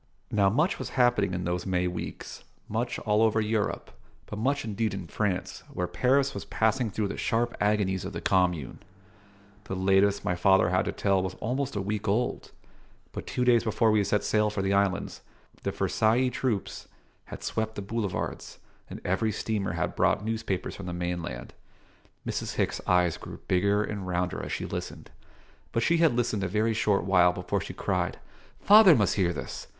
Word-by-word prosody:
Now, 100 -2 +3
much 150 - +1
was - - -4
happening 120 -7 +3
in 90 - -3
those 90 +2 -2
May 90 -1 +1
weeks 90 -1 -6 0.2
much 120 +3 -2
all 105 0 +1
over 110 0 +3
Europe, 110 -1 -1 0.3
but 105 - -7
much 140 +4 0
indeed 110 -1 -1
in 95 -3 -6
France, 95 +2 -2
where 90 - -2
Paris 135 +7 +2
was - - -5
passing 110 +2 0
through 105 +1 -2
the - - -5
sharp 120 +1 0
agonies 105 -3 +1
of 95 - -5
the 85 - -5
Commune. 90 -8 0 0.9
The 95 - -4
latest 95 +1 +2
my 90 - +1
father 95 +1 +4
had 95 - +2
to - - -1
tell 95 -2 +1
was 95 0 -4
almost 130 +3 -2
a 100 - -1
week 105 +1 -3
old; 110 +5 -1 0.6
but - - -7
two 125 - -1
days 120 -2 +4
before 110 0 +2
we 105 -1 +3
set 105 +1 0
sail 105 0 +2
for 105 -2 -3
the 95 0 +1
islands 100 -1 0 0.4
the - - -2
Versaillais 120 +4 +1
troops 115 -8 -3 0.4
had - - -9
swept 110 0 -2
the 100 - -5
boulevards, 105 -2 -4 0.3
and - - -8
every 100 +5 +1
steamer 105 -2 -2
had - - -2
brought 105 - +2
newspapers 110 -4 -2
from 95 - -8
the 90 - -4
mainland. 85 -8 -4 0.7
Mrs. - - -3
Hicks' - - -1
eyes 90 -2 +3
grew - - -9
bigger 100 +3 +2
and 100 -3 -5
rounder 90 0 -1
as - - -6
she - - -3
listened; - - -6 0.6
but 115 - 0
she 170 - +3
had 165 -7 +3
listened 115 -4 0
a - - 0
very 110 +4 +1
short 105 -3 +1
while 90 -1 +4
before 90 0 -2
she - - -7
cried - - -1 0.4
"Father 205 -5 +8
must 105 -7 +2
hear 90 -4 +1
this! 70 -6 -6
105 Hz, 185 wpm, -27 LUFS, 95-115 Hz, 0.9 s, Father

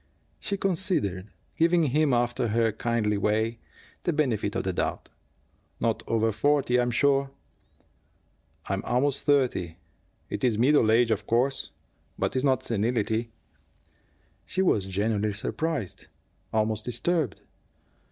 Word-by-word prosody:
She 200 - -3
considered, 165 - -1 0.3
giving 170 +1 +3
him, 150 +1 +2
after 120 -1 +1
her 115 +1 +2
kindly 110 -2 0
way, 110 +3 0 0.4
the 175 - 0
benefit 120 -10 0
of - - -1
the 95 - -2
doubt. - - -3 0.7
"Not - - 0
over 115 0 +1
forty, 125 +2 +2
I'm 120 0 +1
sure." 135 +2 +2 1.4
"I'm 95 0 -2
almost 135 +3 0
thirty. 125 - +1 0.5
It - - -5
is 120 -4 +2
middle 125 -2 +4
age, 115 0 +4
of 105 -1 -1
course, 130 +4 +1 0.5
but - - -1
it - - +2
is 130 - 0
not 135 -2 +2
senility." 115 0 -1 1.2
She 190 - 0
was 105 - +2
genuinely 105 +2 0
surprised, 140 - -3 0.4
almost 110 -1 0
disturbed. 145 - -1
120 Hz, 125 wpm, -27 LUFS, 110-140 Hz, 1.4 s, middle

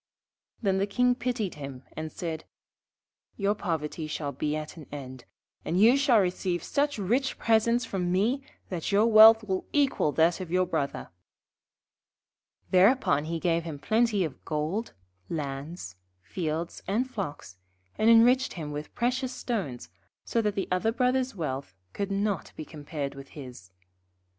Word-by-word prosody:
Then 190 -2 +2
the 200 - +1
King 250 +4 +3
pitied 245 -6 -2
him 135 -2 -7
and 155 0 -5
said: 160 -2 -5 0.9
'Your 200 0 +2
poverty 160 -5 -3
shall 150 -1 -3
be 150 +1 -2
at 155 0 -5
an 155 -4 -11
end, 130 -3 -8 0.4
and 175 - 0
you 230 +5 +7
shall 275 -5 +4
receive 180 -2 -1
such 285 -1 0
rich 240 +7 0
presents 230 +2 +2
from 180 -5 -2
me 220 +9 +1 0.3
that 175 -1 -3
your 205 +2 +4
wealth 220 0 +8
will 190 -3 -2
equal 275 - +2
that 165 +3 +3
of 185 -3 -6
your 185 +1 +2
Brother.' 140 -5 -3 1.6
Thereupon 185 - +4
he 165 +1 -3
gave 170 -1 +1
him 160 -3 -6
plenty 220 +5 +2
of 150 -6 -6
gold, 160 +9 -2 0.4
lands, 140 - -5 0.3
fields, 165 - -3
and 230 +6 +1
flocks, 160 - -6 0.4
and 220 - +3
enriched 245 +3 +5
him 155 -4 -5
with 150 +1 -7
precious 250 +2 0
stones, 190 - -4 0.3
so 230 - +1
that 210 -2 -1
the 195 - -1
other 185 +5 +2
Brother's 250 0 +1
wealth 135 - -4 0.2
could 200 -1 -3
not 200 -2 -1
be 155 - -7
compared 145 -2 -5
with 135 -1 -10
his. 125 -9 -10
185 Hz, 150 wpm, -28 LUFS, 155-225 Hz, 1.6 s, wealth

